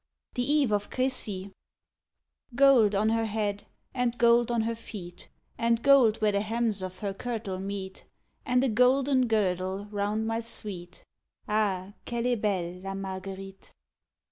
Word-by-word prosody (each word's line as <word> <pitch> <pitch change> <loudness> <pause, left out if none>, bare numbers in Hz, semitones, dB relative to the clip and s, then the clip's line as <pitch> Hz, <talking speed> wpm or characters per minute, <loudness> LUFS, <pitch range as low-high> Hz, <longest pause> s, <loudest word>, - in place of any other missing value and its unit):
THE 245 +3 0
EVE 240 - -1
OF 205 0 -1
CRECY 215 -7 -2 1.0
Gold 245 -6 +5
on 215 +2 +2
her 225 0 +1
head, 205 -2 -2 0.3
and 245 -2 -1
gold 235 0 +4
on 235 -1 +1
her 230 +1 -1
feet, 195 -6 -9 0.3
And 230 0 +1
gold 265 -6 +6
where 215 -1 +3
the 200 0 +1
hems 220 -1 -1
of 185 0 -6
her 200 - -1
kirtle 210 -4 -4
meet, 195 -1 -6 0.4
And 250 0 +2
a 270 - +2
golden 255 +3 +3
girdle 190 -2 0
round 210 +2 -1
my 225 0 -1
sweet; 200 -6 -4 0.4
_Ah! 205 -3 0
qu'elle 235 0 -2
est 245 -3 +1
belle 180 -4 -1
La 195 0 -5
Marguerite. 195 0 -7
215 Hz, 145 wpm, -28 LUFS, 195-235 Hz, 1.0 s, gold